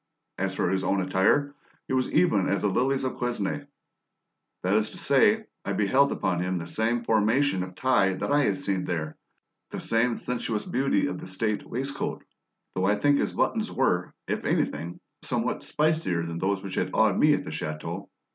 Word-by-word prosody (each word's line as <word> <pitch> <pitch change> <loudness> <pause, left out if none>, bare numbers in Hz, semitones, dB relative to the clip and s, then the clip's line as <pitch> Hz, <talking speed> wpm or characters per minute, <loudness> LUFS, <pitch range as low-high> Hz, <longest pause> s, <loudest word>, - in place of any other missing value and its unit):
As - - -1
for 90 - 0
his 95 0 0
own 100 +1 +1
attire, 95 +10 +2 0.3
he - - -3
was 130 -1 +1
even 105 - +3
as 100 0 0
the 105 - +3
lilies 135 +7 +1
of 130 - -3
Quesnay; 125 +4 -2 1.0
that 95 +3 +2
is 110 0 +2
to - - -11
say, 210 +11 +3 0.2
I 100 - -2
beheld 130 +8 +3
upon 90 -2 -1
him 90 0 -1
the 85 -1 -5
same 115 +5 0
formation 110 0 +2
of 90 0 -6
tie 95 -6 +2
that 95 - -3
I 145 0 +4
had 100 -2 +1
seen 95 0 -2
there, 80 -3 -3 0.5
the - - -5
same 115 +1 +1
sensuous 115 -3 -3
beauty 135 +3 +1
of 145 - -3
the - - -8
state 105 +3 -1
waistcoat, 135 +4 -3 0.5
though 95 - 0
I 105 +2 +3
think 145 +7 +3
that - - +2
his - - -7
buttons 220 -1 0
were, 90 -9 0
if - - -2
anything, 85 +2 -1 0.2
somewhat - - -2
spicier 150 - 0
than 85 0 -4
those 95 +1 0
which 95 -1 -6
had - - -1
awed - - +3
me - - +5
at - - -4
the - - -7
chateau. 85 +5 -5
105 Hz, 195 wpm, -27 LUFS, 95-130 Hz, 1.0 s, me